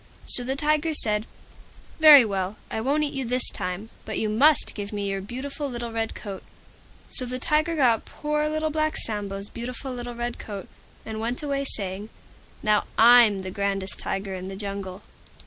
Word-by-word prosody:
So 245 - -1
the 265 +2 -2
Tiger 305 +2 +1
said, 215 -5 +2 0.7
"Very 300 -5 +10
well, 195 -1 -2 0.2
I 220 - -2
won't 285 +6 +1
eat 290 - -2
you 270 - -2
this 250 +1 +2
time, 185 +5 -3
but - - -4
you 215 - 0
must 275 +8 +4
give 205 -1 -6
me 205 -1 -3
your 195 0 -3
beautiful 275 +7 -5
little 240 -2 -5
Red 225 0 -2
Coat." 195 -2 -7 0.7
So - - -3
the 250 0 -4
Tiger 310 +4 +1
got 245 -7 +3
poor 300 0 -2
Little 310 0 -1
Black 310 0 0
Sambo's 200 -2 -3
beautiful 250 +3 -6
little 245 -1 -6
Red 240 0 -4
Coat, 200 -3 -7 0.4
and 220 -1 -5
went 235 +5 -3
away 280 -1 -1
saying, 200 -3 -2 0.5
"Now 210 -1 +3
I'm 225 -4 +7
the 185 - -5
grandest 195 -1 -1
Tiger 195 0 -3
in 185 0 -6
the 195 - -6
Jungle." 195 -1 -6
230 Hz, 180 wpm, -25 LUFS, 200-275 Hz, 0.7 s, Very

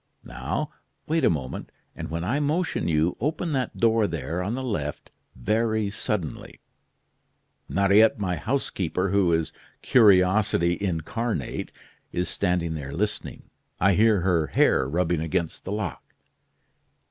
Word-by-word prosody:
Now, - - -3 0.3
wait 160 0 0
a - - +5
moment, 70 -6 -4 0.2
and - - -6
when 85 +1 -3
I 120 +11 0
motion 150 - 0
you, 80 +1 +2
open 155 +5 -1
that 130 -4 -2
door 115 -2 +3
there, 85 +1 -3
on 105 +6 -2
the 130 - -4
left, 75 - -4 0.2
very 110 - 0
suddenly. 100 -5 -4 1.1
Mariette, 100 +3 +4
my 95 -4 -1
housekeeper, 95 - -1
who 100 -3 +3
is 80 -1 0 0.3
curiosity 95 -5 +4
incarnate, 95 - -2 0.4
is 90 +1 -2
standing 90 -4 0
there 70 -3 -6
listening. 105 +6 -3 0.4
I 100 +2 +4
hear 105 0 +4
her 85 -4 +2
hair 65 -1 +3
rubbing 85 +1 0
against 80 +1 -2
the - - -4
lock. 105 -5 -3
95 Hz, 130 wpm, -25 LUFS, 85-110 Hz, 1.1 s, a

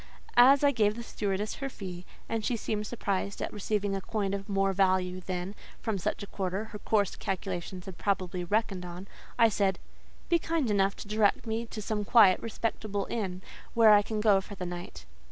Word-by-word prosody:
As 265 +4 +8
I 285 - +6
gave 215 -5 +2
the 235 - -6
stewardess 205 -2 -2
her 275 0 -3
fee—and 190 +2 -6
she 235 +2 0
seemed 210 -1 -3
surprised 200 -4 -2
at - - -4
receiving 205 -1 -1
a 195 - -3
coin 200 -1 -2
of 200 +1 -4
more 195 -1 +2
value 185 -1 +2
than, 185 +1 -4 0.3
from 220 -4 -2
such 180 - -2
a - - -4
quarter, 195 0 -3
her 210 - -6
coarse 205 -3 +1
calculations 185 -1 -4
had 190 -3 -9
probably 185 -3 -1
reckoned 195 0 0
on—I 185 +6 -1
said, 195 -3 +1 0.5
"Be 340 - +3
kind 320 -8 0
enough 195 -1 +2
to - - -9
direct 210 +1 +2
me 225 +1 -2
to 215 -1 -6
some 210 0 -1
quiet, 205 -3 +6
respectable 215 -2 -2
inn, 190 -5 -3 0.3
where 225 -2 +7
I 205 - +7
can 215 +1 -3
go 205 -3 +5
for 200 +2 -10
the 180 - -5
night." 175 - -7
200 Hz, 190 wpm, -29 LUFS, 190-220 Hz, 0.5 s, As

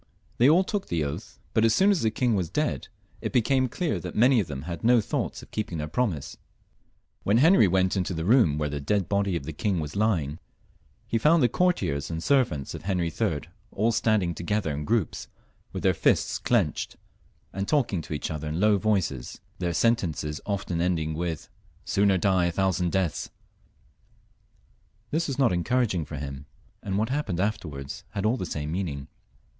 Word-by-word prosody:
They 125 +4 +6
all 175 +5 +5
took 200 +1 -3
the 85 -3 0
oath« 80 +6 -6 0.2
but 110 - +3
as 115 -1 +4
soon 195 +2 +5
as 195 - +1
the 110 - +2
king 120 +1 +1
was 90 -5 0
dead, 150 - -1 0.3
it - - -3
became 130 +1 +2
clear 155 - -1
that - - -7
many 125 +2 +5
of 100 - -1
them 70 -1 -6
had 85 +1 -5
ho 120 +1 +5
thoughts 105 - -3
of - - -16
keeping 105 -6 -3
their 75 0 -3
promise. 85 - -2 0.8
When 100 +3 +2
Henry 150 - +6
went 95 +1 +2
into 90 -1 -1
the 80 0 -3
room 105 - +4
where 75 -1 0
the 70 -1 -4
dead 95 +5 0
body 100 -2 +1
of 85 - -2
the 80 +3 -6
king 95 +3 -1
was 75 -2 -5
lying, 85 -9 0 0.7
he 115 - 0
found 155 +5 +4
the 120 - +4
courtiers 95 - 0
and 80 0 -4
servants 120 - +1
of - - -7
Henry 90 -4 -1
III. - - 0 0.3
all 110 +4 +1
standing 105 -6 +1
together 85 -2 -1
in 75 +1 -4
groups, 110 - -1 0.4
with - - -5
their - - +4
fists - - +1
clenched, - - 0 0.6
and 95 +1 -3
talking 120 - +1
to 80 - -7
each 75 - -3
other 75 0 -4
in 80 +3 -2
low 105 0 +4
voices, 95 - -1 0.2
their 90 -1 -1
sentences 85 -7 0
often 95 -4 -2
ending 80 -3 0
with, 80 -1 -3 0.4
''Sooner 100 -1 +3
die 95 -2 +3
a 85 - +1
thousand 90 -1 0
deaths/' 95 -4 -1 1.8
This 165 +3 0
was 135 -3 -3
not 130 -8 +3
encouraging 95 -2 +1
for 75 - -7
him, 70 0 -6 0.3
and 95 -1 -2
what 110 +3 0
happened 130 - -1
afterwards 85 -10 -3
had 100 -1 -2
all 110 +3 +3
the 95 - -4
same 75 -1 -4
meaning. 80 -6 -3
95 Hz, 190 wpm, -26 LUFS, 80-115 Hz, 1.8 s, They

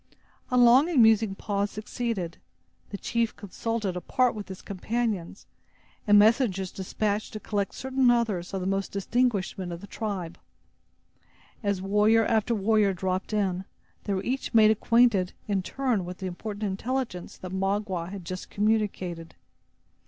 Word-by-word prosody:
A 250 - +1
long 250 +6 +6
and 320 -7 +2
musing 220 -3 +5
pause 200 0 -1
succeeded. 215 -5 -4 0.5
The 200 - -5
chief 230 +2 -1
consulted 210 0 -3
apart 250 +7 +1
with 210 -2 -7
his 190 -1 -9
companions, 205 -2 -3 0.6
and 205 0 +7
messengers 205 -4 +3
despatched 205 +2 -2
to 215 - -5
collect 205 -2 -2
certain 260 -1 +2
others 220 -7 +1
of 195 - -3
the - - -3
most 195 0 -1
distinguished 205 0 0
men 180 -2 -4
of 170 - -6
the 200 - -10
tribe. 195 -5 -5 1.2
As 200 -4 -1
warrior 210 +3 +4
after 225 +1 +1
warrior 210 -1 +3
dropped 185 +2 -2
in, 190 -3 0 0.4
they 200 - 0
were 190 - -2
each 260 -1 -3
made 215 -1 +7
acquainted, 220 -4 +3
in 200 -2 +1
turn, 245 -1 -1
with 180 +1 -7
the 190 - -6
important 205 +4 -5
intelligence 210 -1 -3
that 185 - -8
Magua 190 -2 -1
had 190 -2 -8
just 185 +2 -6
communicated. 200 -6 -1
205 Hz, 150 wpm, -27 LUFS, 190-225 Hz, 1.2 s, and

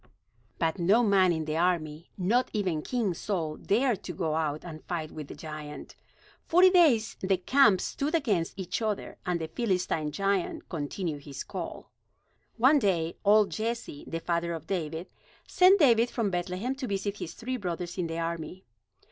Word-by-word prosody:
But 165 +2 0
no 200 +8 +4
man 195 -4 +4
in 160 -2 -1
the 155 +1 -2
army, 165 -2 0
not 235 +7 +2
even 185 -7 0
King 225 -1 -1
Saul, 165 -4 -3
dared 235 0 +1
to - - -4
go 160 -4 -1
out 155 -1 -1
and 155 -3 -8
fight 160 -3 -4
with 155 -2 -7
the - - -9
giant. 150 -2 -8 0.5
Forty 365 +2 +5
days 295 - +4
the 190 0 +1
camps 210 -1 +4
stood 295 +4 -2
against 205 - 0
each 185 +2 -3
other, 215 -2 -3
and 175 -1 0
the 160 - -3
Philistine 180 -6 -1
giant 195 +1 -1
continued 150 -1 -4
his 140 -2 -6
call. - - -7 0.7
One 265 +6 +5
day, 170 -7 0
old 210 0 +5
Jesse, 225 -9 -4
the 165 - -3
father 170 0 -1
of 160 -2 -6
David, 165 -2 -3 0.4
sent 370 +2 +6
David 240 -5 +5
from 225 -5 -1
Bethlehem 180 +7 -2
to 265 -2 -4
visit 200 0 -2
his - - -6
three 255 +2 -4
brothers 175 -3 -4
in 175 - 0
the 165 0 -4
army. 170 +2 -4
185 Hz, 170 wpm, -28 LUFS, 165-220 Hz, 0.7 s, sent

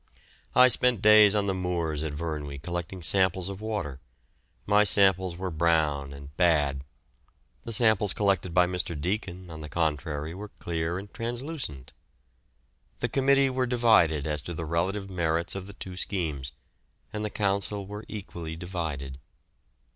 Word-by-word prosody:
I 125 0 +8
spent 125 -3 +2
days 105 -1 +7
on 105 -1 +2
the 95 - 0
moors 85 -5 -2
at 80 -2 -3
Vyrnwy 75 -3 -4
collecting 85 +1 -4
samples 95 0 +4
of 100 +1 -7
water. 105 -11 -4 0.7
My 105 +1 +5
samples 95 -4 +3
were 95 0 -3
brown 75 -4 +1
and 70 +1 -11
bad; 75 -6 +2 0.8
the 115 - -4
samples 110 -3 +3
collected 95 -3 +1
by 90 +1 +4
Mr. 90 -3 -3
Deacon, 90 0 -3
on 80 -1 -8
the 75 - -7
contrary, 75 -1 -2
were 100 +4 -7
clear 85 -3 -3
and 100 +1 -9
translucent. 120 - -4 1.1
The - - -1
committee 135 0 +3
were 130 0 0
divided 110 - +3
as 75 -1 -1
to 85 +3 -6
the 85 - -4
relative 95 +5 -1
merits 85 -2 -1
of 95 -1 -6
the 100 - -10
two 95 -2 -8
schemes, 75 -10 -3 0.6
and 105 0 -3
the 105 - -2
Council 100 0 0
were 105 +2 -7
equally 85 -6 -7
divided. 80 -7 -5
90 Hz, 150 wpm, -27 LUFS, 80-105 Hz, 1.1 s, I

